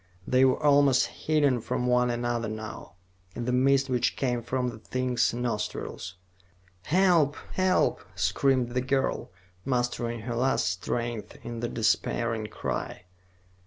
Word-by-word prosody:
They 130 Hz, +1 st, +3 dB
were 130 Hz, -, +3 dB
almost 140 Hz, -3 st, +5 dB
hidden 145 Hz, -6 st, +1 dB
from 125 Hz, -, -2 dB
one 125 Hz, 0 st, +3 dB
another 120 Hz, -1 st, -1 dB
now, 110 Hz, -5 st, -7 dB, 0.4 s
in 120 Hz, -, -4 dB
the 125 Hz, -, 0 dB
mist 135 Hz, +2 st, +3 dB
which 125 Hz, -2 st, 0 dB
came 125 Hz, -3 st, -1 dB
from 125 Hz, +2 st, -1 dB
the 115 Hz, -2 st, -9 dB
thing's 125 Hz, +1 st, 0 dB
nostrils. 115 Hz, -6 st, -4 dB, 0.7 s
"Help, 170 Hz, -4 st, +3 dB, 0.2 s
help!" 185 Hz, 0 st, +2 dB
screamed 120 Hz, +8 st, +1 dB
the 125 Hz, +1 st, -1 dB
girl, 135 Hz, +1 st, -1 dB, 0.3 s
mustering 120 Hz, -2 st, -1 dB
her 120 Hz, +2 st, -4 dB
last 125 Hz, -6 st, +1 dB
strength 105 Hz, +4 st, -3 dB
in 120 Hz, -1 st, -6 dB
the 120 Hz, 0 st, -2 dB
despairing 115 Hz, 0 st, 0 dB
cry. 90 Hz, -, -4 dB
125 Hz, 130 wpm, -27 LUFS, 115-130 Hz, 0.7 s, almost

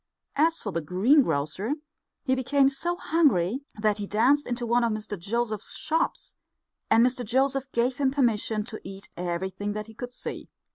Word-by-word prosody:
As 325 Hz, +3 st, +3 dB
for 205 Hz, -, -4 dB
the 170 Hz, -, -2 dB
greengrocer, 190 Hz, -, +2 dB, 0.5 s
he 260 Hz, -, +1 dB
became 270 Hz, +1 st, +3 dB
so 330 Hz, +6 st, -2 dB
hungry 275 Hz, -, +2 dB, 0.2 s
that 210 Hz, 0 st, +1 dB
he 205 Hz, -, -3 dB
danced 255 Hz, +8 st, +3 dB
into 240 Hz, 0 st, -2 dB
one 240 Hz, +1 st, +2 dB
of 230 Hz, -, +2 dB
Mr 215 Hz, -1 st, -4 dB
Joseph's 215 Hz, +3 st, -2 dB
shops, 320 Hz, +1 st, -1 dB, 0.6 s
and 230 Hz, +2 st, +6 dB
Mr 250 Hz, 0 st, 0 dB
Joseph 270 Hz, +3 st, +1 dB
gave 245 Hz, +2 st, +1 dB
him 275 Hz, -2 st, +2 dB
permission 225 Hz, -5 st, +1 dB
to 220 Hz, 0 st, -8 dB
eat 195 Hz, +1 st, -9 dB
everything 190 Hz, +3 st, -3 dB
that 210 Hz, 0 st, -4 dB
he 220 Hz, -, -13 dB
could 245 Hz, +2 st, -7 dB
see. -, -, -6 dB
235 Hz, 165 wpm, -27 LUFS, 205-270 Hz, 0.6 s, and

